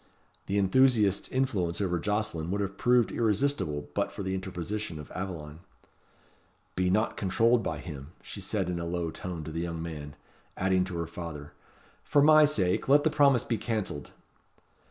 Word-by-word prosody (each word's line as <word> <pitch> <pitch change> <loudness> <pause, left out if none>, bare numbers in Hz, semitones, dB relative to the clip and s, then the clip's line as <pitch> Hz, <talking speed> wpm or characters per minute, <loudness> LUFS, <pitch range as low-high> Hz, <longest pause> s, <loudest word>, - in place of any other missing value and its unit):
The 100 - 0
enthusiast's 105 -1 +3
influence 100 -11 0
over 90 -4 0
Jocelyn 105 -4 -1
would 100 +2 -1
have 100 0 -3
proved 120 -2 +3
irresistible 110 - 0
but - - -1
for - - -6
the 95 0 -2
interposition 95 0 -4
of 75 - -10
Aveline. 80 -5 -6 1.2
"Be 90 0 +1
not 110 +4 +1
controlled 115 +5 +3
by 80 -6 -3
him," 75 -3 -8 0.2
she 100 - -7
said 95 -1 -1
in 90 -1 -2
a 85 - -3
low 85 -1 -2
tone 85 -2 -6
to 80 - -6
the 80 +1 -3
young 85 -1 -4
man; 75 -3 -6 0.4
adding 95 0 +2
to 90 -2 -5
her 85 - -2
father, 80 -3 -8 0.5
"For 145 -1 +3
my 155 0 +8
sake, 95 -11 0
let 145 +1 +6
the 160 - +2
promise 140 -5 +4
be 115 -3 -2
cancelled." 110 -10 -3
95 Hz, 170 wpm, -29 LUFS, 85-110 Hz, 1.2 s, my